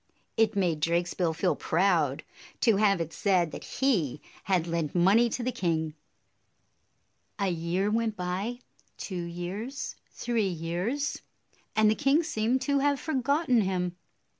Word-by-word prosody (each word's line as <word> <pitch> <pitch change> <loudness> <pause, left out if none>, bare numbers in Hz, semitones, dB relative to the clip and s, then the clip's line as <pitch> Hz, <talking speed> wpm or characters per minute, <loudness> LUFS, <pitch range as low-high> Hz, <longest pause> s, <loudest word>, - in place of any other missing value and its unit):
It 220 -1 +2
made 175 -6 +1
Drakesbill 170 +1 0
feel 180 +3 +1
proud 165 -5 +1 0.4
to 225 -4 +4
have 200 -3 +3
it 165 -1 -3
said 180 -5 +2
that - - -7
he 190 - 0 0.3
had 185 -4 +2
lent 165 -2 -2
money 200 +7 +5
to 240 - -3
the 255 - 0
king. 165 -8 -1 1.4
A 200 -2 +1
year 175 +4 0
went 225 -1 0
by, 190 +7 -3 0.2
— - - -36
two 180 -3 -4
years, 185 +10 -5
three 230 -4 -1
years, 180 - -2 0.3
— - - -37
and 220 0 +5
the 215 - +5
king 285 +6 +3
seemed 240 -2 0
to 280 -1 +2
have 285 0 +2
forgotten 280 -3 +2
him. 180 -2 -1
195 Hz, 145 wpm, -28 LUFS, 170-235 Hz, 1.4 s, money